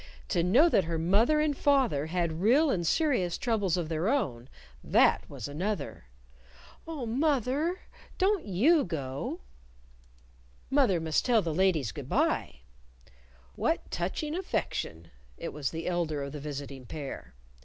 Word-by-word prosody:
To 175 Hz, -, +2 dB
know 230 Hz, -, +5 dB
that 195 Hz, -, +3 dB
her 165 Hz, 0 st, -2 dB
mother 205 Hz, -, +3 dB
and 300 Hz, -1 st, +1 dB
father 260 Hz, -, +2 dB
had 170 Hz, -1 st, -1 dB
real 270 Hz, +9 st, +4 dB
and 175 Hz, -6 st, -1 dB
serious 245 Hz, -, +1 dB
troubles 205 Hz, -7 st, 0 dB
of 170 Hz, -3 st, -2 dB
their 160 Hz, +5 st, -1 dB
own, 135 Hz, -, -1 dB, 0.3 s
that -, -, +3 dB
was -, -, -6 dB
another! 160 Hz, -, -4 dB, 0.8 s
"Oh, 310 Hz, -6 st, -4 dB
moth 260 Hz, +1 st, +1 dB
er! 315 Hz, +8 st, -1 dB, 0.4 s
Don't 390 Hz, -1 st, +2 dB
you 265 Hz, -, +3 dB
go!" 140 Hz, -6 st, -4 dB, 1.3 s
"Mother 260 Hz, -11 st, +3 dB
must 160 Hz, -1 st, 0 dB
tell 235 Hz, -4 st, +3 dB
the 165 Hz, -, -2 dB
ladies 165 Hz, -, +2 dB
good -, -, -8 dB
by." -, -, 0 dB, 0.9 s
"What -, -, -1 dB
touching 190 Hz, -, -2 dB
affection!" 85 Hz, -, -3 dB, 0.3 s
It -, -, -6 dB
was 145 Hz, -2 st, -2 dB
the 165 Hz, 0 st, -6 dB
elder 165 Hz, -5 st, -1 dB
of 140 Hz, -, -5 dB
the 150 Hz, -, -6 dB
visiting 140 Hz, -3 st, -7 dB
pair. 140 Hz, -, -7 dB
180 Hz, 145 wpm, -29 LUFS, -, 1.3 s, know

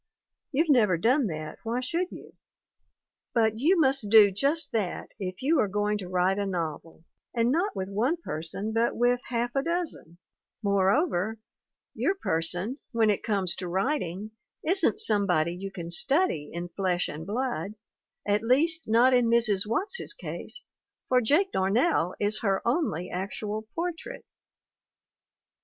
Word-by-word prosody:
You've 315 Hz, +3 st, +1 dB
never 210 Hz, -9 st, +4 dB
done 250 Hz, -, +2 dB
that 155 Hz, -3 st, -6 dB
why 235 Hz, +2 st, -2 dB
should 335 Hz, +8 st, -2 dB
you? -, -, -11 dB, 1.0 s
But 220 Hz, -1 st, +2 dB
you 335 Hz, +7 st, +3 dB
must 265 Hz, -7 st, +2 dB
do 210 Hz, -2 st, +7 dB
just 285 Hz, -, 0 dB
that 210 Hz, -6 st, -2 dB
if 185 Hz, +2 st, -5 dB
you 305 Hz, +2 st, +3 dB
are 215 Hz, -, +3 dB
going 210 Hz, +1 st, -1 dB
to 185 Hz, -, -6 dB
write 185 Hz, +2 st, +1 dB
a 200 Hz, -, -1 dB
novel, 165 Hz, -3 st, -5 dB, 0.3 s
and 235 Hz, +1 st, +2 dB
not 350 Hz, +8 st, 0 dB
with 190 Hz, -1 st, -3 dB
one 230 Hz, -, 0 dB
person, 195 Hz, -, -5 dB
but 230 Hz, +1 st, +1 dB
with 245 Hz, +1 st, +2 dB
half 240 Hz, 0 st, -2 dB
a 275 Hz, -, +2 dB
dozen; 335 Hz, -, -4 dB, 0.5 s
moreover, 200 Hz, -, +1 dB, 0.6 s
your 390 Hz, -, 0 dB
person, 180 Hz, -, -1 dB
when 225 Hz, -2 st, +3 dB
it 205 Hz, -, -1 dB
comes 195 Hz, -5 st, 0 dB
to 185 Hz, -, -5 dB
writing, 195 Hz, -, -2 dB, 0.3 s
isn't 385 Hz, +4 st, +3 dB
somebody 180 Hz, -, +2 dB
you 195 Hz, +2 st, -6 dB
can 170 Hz, -3 st, -7 dB
study 175 Hz, -, +1 dB
in 175 Hz, +1 st, -5 dB
flesh 180 Hz, -1 st, -1 dB
and 155 Hz, +4 st, -7 dB
blood, 215 Hz, -4 st, -3 dB, 0.5 s
at 205 Hz, +1 st, +2 dB
least, 315 Hz, +8 st, +2 dB
not 235 Hz, +4 st, +4 dB
in 245 Hz, -2 st, +4 dB
Mrs. 225 Hz, -4 st, +3 dB
Watts's 400 Hz, -, 0 dB
case, -, -, -5 dB, 0.4 s
for 255 Hz, -1 st, +4 dB
Jake 325 Hz, -, +2 dB
Darnell 195 Hz, -, +1 dB
is 210 Hz, +1 st, 0 dB
her 195 Hz, -1 st, -1 dB
only 235 Hz, -, -1 dB
actual 210 Hz, +3 st, -4 dB
portrait. 350 Hz, +8 st, -5 dB
220 Hz, 145 wpm, -27 LUFS, 190-270 Hz, 1.0 s, do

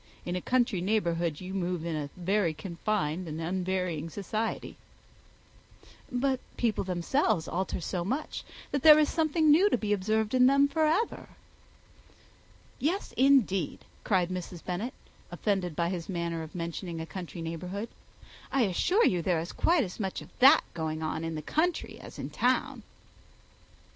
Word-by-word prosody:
In 175 Hz, -, -2 dB
a 180 Hz, -, -2 dB
country 240 Hz, -6 st, +1 dB
neighbourhood 170 Hz, -6 st, 0 dB
you 185 Hz, +1 st, -6 dB
move 180 Hz, -3 st, -2 dB
in 165 Hz, -2 st, -2 dB
a 145 Hz, -2 st, -3 dB
very 180 Hz, -2 st, +1 dB
confined 180 Hz, -1 st, -2 dB
and 155 Hz, 0 st, -5 dB
unvarying 180 Hz, -2 st, -2 dB
society." 215 Hz, +5 st, -3 dB, 1.4 s
"But 260 Hz, +1 st, +1 dB, 0.2 s
people 230 Hz, -4 st, +1 dB
themselves 180 Hz, -, 0 dB
alter 185 Hz, +2 st, -2 dB
so 175 Hz, +1 st, -3 dB
much, 260 Hz, -, -3 dB, 0.3 s
that 285 Hz, -, 0 dB
there 305 Hz, +1 st, +9 dB
is 305 Hz, -1 st, +3 dB
something 315 Hz, -1 st, +3 dB
new 365 Hz, +7 st, +6 dB
to -, -, +2 dB
be 210 Hz, -2 st, 0 dB
observed 215 Hz, +3 st, 0 dB
in 255 Hz, 0 st, +6 dB
them 275 Hz, +1 st, +5 dB
for 315 Hz, +2 st, +1 dB
ever." 390 Hz, +9 st, 0 dB, 1.5 s
"Yes, 355 Hz, +8 st, -1 dB
indeed," 245 Hz, -, +3 dB, 0.2 s
cried 185 Hz, -4 st, +2 dB
Mrs. 180 Hz, -1 st, -6 dB
Bennet, 190 Hz, +8 st, -3 dB, 0.3 s
offended 190 Hz, -6 st, -1 dB
by 170 Hz, +1 st, 0 dB
his 175 Hz, -2 st, -4 dB
manner 170 Hz, -2 st, -2 dB
of 160 Hz, +1 st, -9 dB
mentioning 170 Hz, 0 st, -4 dB
a 160 Hz, -, -4 dB
country 175 Hz, -1 st, -7 dB
neighbourhood. 180 Hz, +7 st, -5 dB, 0.6 s
"I 270 Hz, -2 st, +3 dB
assure 355 Hz, -, +2 dB
you 180 Hz, -2 st, +2 dB
there 170 Hz, -1 st, +1 dB
is 165 Hz, +2 st, -5 dB
quite 335 Hz, -4 st, +3 dB
as 180 Hz, 0 st, -7 dB
much 190 Hz, -3 st, -2 dB
of -, -, -12 dB
that 265 Hz, +2 st, +8 dB
going 160 Hz, -1 st, -3 dB
on 155 Hz, +1 st, -2 dB
in 165 Hz, 0 st, -3 dB
the 155 Hz, -, -5 dB
country 330 Hz, -, -1 dB
as -, -, -11 dB
in -, -, -5 dB
town." -, -, +1 dB
185 Hz, 160 wpm, -29 LUFS, 170-250 Hz, 1.5 s, there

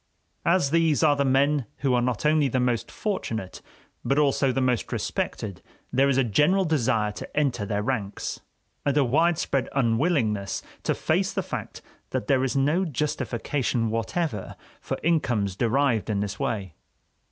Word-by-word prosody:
As 170 Hz, -5 st, +3 dB
these 165 Hz, -4 st, +3 dB
are 150 Hz, -2 st, +5 dB
the 140 Hz, -, +1 dB
men 135 Hz, -1 st, +2 dB
who 135 Hz, -3 st, +2 dB
are 120 Hz, -, +3 dB
not 125 Hz, +1 st, -1 dB
only 150 Hz, -1 st, +4 dB
the 130 Hz, 0 st, 0 dB
most 120 Hz, -2 st, 0 dB
fortunate 115 Hz, -, -4 dB, 0.4 s
but 135 Hz, -, +1 dB
also 140 Hz, -2 st, +3 dB
the 130 Hz, -, -1 dB
most 125 Hz, -3 st, 0 dB
respected, 100 Hz, -5 st, -3 dB, 0.3 s
there 135 Hz, +2 st, +4 dB
is 135 Hz, -, +2 dB
a 135 Hz, -, +4 dB
general 150 Hz, -, +3 dB
desire 125 Hz, -9 st, +1 dB
to -, -, -9 dB
enter 130 Hz, -8 st, +1 dB
their 105 Hz, 0 st, -1 dB
ranks, 105 Hz, -5 st, -3 dB, 0.4 s
and 145 Hz, 0 st, +1 dB
a 145 Hz, -, +5 dB
widespread 155 Hz, 0 st, +1 dB
unwillingness 115 Hz, -, +1 dB, 0.2 s
to -, -, 0 dB
face -, -, 0 dB
the -, -, -2 dB
fact -, -, -6 dB, 0.3 s
that -, -, -2 dB
there 130 Hz, +3 st, +2 dB
is 135 Hz, +1 st, 0 dB
no 150 Hz, +7 st, +2 dB
justification 130 Hz, -, -1 dB
whatever 115 Hz, -, -2 dB, 0.2 s
for -, -, -4 dB
incomes 120 Hz, -, +1 dB
derived 120 Hz, 0 st, +1 dB
in 105 Hz, -2 st, 0 dB
this 100 Hz, -1 st, -4 dB
way. 100 Hz, -7 st, -2 dB
130 Hz, 160 wpm, -25 LUFS, 115-150 Hz, 0.4 s, are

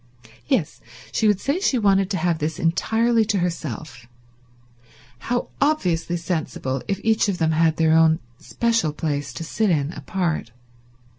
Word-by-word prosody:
Yes, 195 Hz, -, 0 dB, 0.3 s
she 220 Hz, -, +1 dB
would 205 Hz, -3 st, +3 dB
say 280 Hz, -, -1 dB
she 285 Hz, -9 st, +1 dB
wanted 195 Hz, -3 st, +3 dB
to 190 Hz, -, -1 dB
have 165 Hz, -1 st, 0 dB
this 155 Hz, 0 st, -2 dB
entirely 225 Hz, +7 st, +2 dB
to 210 Hz, -1 st, 0 dB
herself. 155 Hz, -, -4 dB, 1.2 s
How 245 Hz, 0 st, 0 dB
obviously 180 Hz, -, +1 dB
sensible 150 Hz, -6 st, -3 dB
if 195 Hz, -1 st, -1 dB
each 220 Hz, -1 st, +2 dB
of 190 Hz, -, -1 dB
them 160 Hz, -2 st, +1 dB
had 160 Hz, 0 st, +2 dB
their 160 Hz, -1 st, +3 dB
own 160 Hz, 0 st, +5 dB, 0.2 s
special 230 Hz, -10 st, 0 dB
place 145 Hz, -3 st, -3 dB
to 165 Hz, -, -6 dB
sit 210 Hz, +6 st, 0 dB
in 150 Hz, -3 st, +1 dB
apart. 175 Hz, -10 st, -2 dB
170 Hz, 150 wpm, -22 LUFS, 155-215 Hz, 1.2 s, own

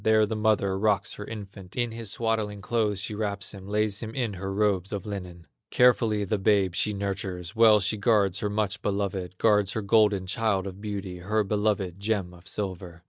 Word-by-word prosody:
There 110 Hz, -1 st, +4 dB
the 110 Hz, +1 st, -3 dB
mother 105 Hz, -3 st, +1 dB
rocks 105 Hz, -1 st, +1 dB
her 105 Hz, -, -7 dB
infant, 100 Hz, -4 st, -9 dB
In 120 Hz, -2 st, 0 dB
his 115 Hz, -2 st, -6 dB
swaddling 110 Hz, -2 st, -1 dB
clothes 105 Hz, -1 st, 0 dB
she 105 Hz, +2 st, -4 dB
wraps 105 Hz, -1 st, -2 dB
him, 95 Hz, -1 st, -10 dB
Lays 105 Hz, 0 st, 0 dB
him 110 Hz, -1 st, -6 dB
in 120 Hz, -5 st, -1 dB
her 95 Hz, +1 st, -5 dB
robes 100 Hz, -2 st, +1 dB
of 100 Hz, -3 st, -4 dB
linen; 90 Hz, -5 st, -7 dB, 0.2 s
Carefully 115 Hz, -4 st, +3 dB
the 100 Hz, +1 st, -1 dB
babe 95 Hz, -2 st, +3 dB
she 105 Hz, -, +1 dB
nurtures, 95 Hz, -3 st, -4 dB
Well 110 Hz, -2 st, +7 dB
she 105 Hz, +3 st, 0 dB
guards 100 Hz, -4 st, +2 dB
her 105 Hz, -, -1 dB
much 105 Hz, 0 st, -1 dB
beloved, 95 Hz, -2 st, -2 dB
Guards 105 Hz, -2 st, +3 dB
her 110 Hz, -, -2 dB
golden 105 Hz, -2 st, +3 dB
child 100 Hz, -1 st, 0 dB
of 95 Hz, 0 st, -7 dB
beauty, 100 Hz, -4 st, -5 dB
Her 105 Hz, +4 st, 0 dB
beloved 100 Hz, -3 st, -1 dB
gem 100 Hz, -4 st, -1 dB
of 90 Hz, +1 st, -15 dB
silver. 95 Hz, -4 st, -5 dB
100 Hz, 195 wpm, -27 LUFS, 95-110 Hz, 0.2 s, Well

